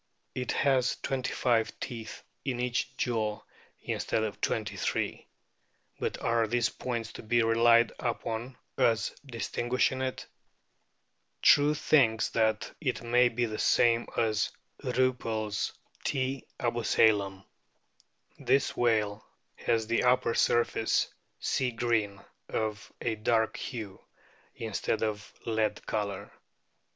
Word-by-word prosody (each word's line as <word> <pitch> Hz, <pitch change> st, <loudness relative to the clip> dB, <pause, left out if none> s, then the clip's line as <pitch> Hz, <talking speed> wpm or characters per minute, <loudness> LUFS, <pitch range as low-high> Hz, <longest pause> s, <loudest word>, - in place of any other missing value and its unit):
It 125 Hz, -1 st, -2 dB
has 130 Hz, -3 st, +2 dB
twenty 130 Hz, -2 st, -1 dB
five 115 Hz, -3 st, +1 dB
teeth 115 Hz, -3 st, -6 dB, 0.2 s
in 130 Hz, -3 st, -2 dB
each 125 Hz, -1 st, -1 dB
jaw 110 Hz, -4 st, -1 dB, 0.4 s
instead 110 Hz, -, -1 dB
of 110 Hz, -2 st, -4 dB
twenty 105 Hz, -2 st, -1 dB
three; 95 Hz, -, -2 dB, 0.7 s
but -, -, -2 dB
are 115 Hz, -1 st, +2 dB
these 120 Hz, 0 st, +1 dB
points 115 Hz, -3 st, -4 dB
to -, -, -8 dB
be 120 Hz, +1 st, +2 dB
relied 115 Hz, +1 st, +5 dB
upon 120 Hz, +1 st, -3 dB, 0.2 s
as 115 Hz, -1 st, +3 dB
distinguishing 125 Hz, 0 st, -1 dB
it? 130 Hz, -1 st, -3 dB, 1.2 s
True 145 Hz, +1 st, +6 dB
thinks 120 Hz, -7 st, +3 dB
that 110 Hz, -2 st, 0 dB
it 130 Hz, -5 st, -1 dB
may 120 Hz, +1 st, +4 dB
be 120 Hz, +1 st, 0 dB
the 110 Hz, -1 st, -5 dB
same 120 Hz, 0 st, +3 dB
as 110 Hz, -2 st, +1 dB, 0.3 s
Riippel's 120 Hz, -5 st, 0 dB, 0.3 s
T, 130 Hz, -1 st, -1 dB
abusalam. 105 Hz, -4 st, +2 dB, 1.0 s
This 135 Hz, -, +2 dB
whale 110 Hz, -3 st, +1 dB, 0.3 s
has 115 Hz, -1 st, 0 dB
the 115 Hz, +1 st, +1 dB
upper 125 Hz, -2 st, +3 dB
surface 120 Hz, -1 st, +2 dB, 0.3 s
sea 130 Hz, -2 st, 0 dB
green, 115 Hz, -4 st, 0 dB, 0.3 s
of 110 Hz, -2 st, -3 dB
a 115 Hz, -, 0 dB
dark 110 Hz, +1 st, +1 dB
hue, 110 Hz, -7 st, -6 dB, 0.5 s
instead 110 Hz, 0 st, -2 dB
of 105 Hz, -1 st, -3 dB
lead 110 Hz, -2 st, 0 dB
colour. 100 Hz, -3 st, -3 dB
115 Hz, 115 wpm, -29 LUFS, 110-125 Hz, 1.2 s, True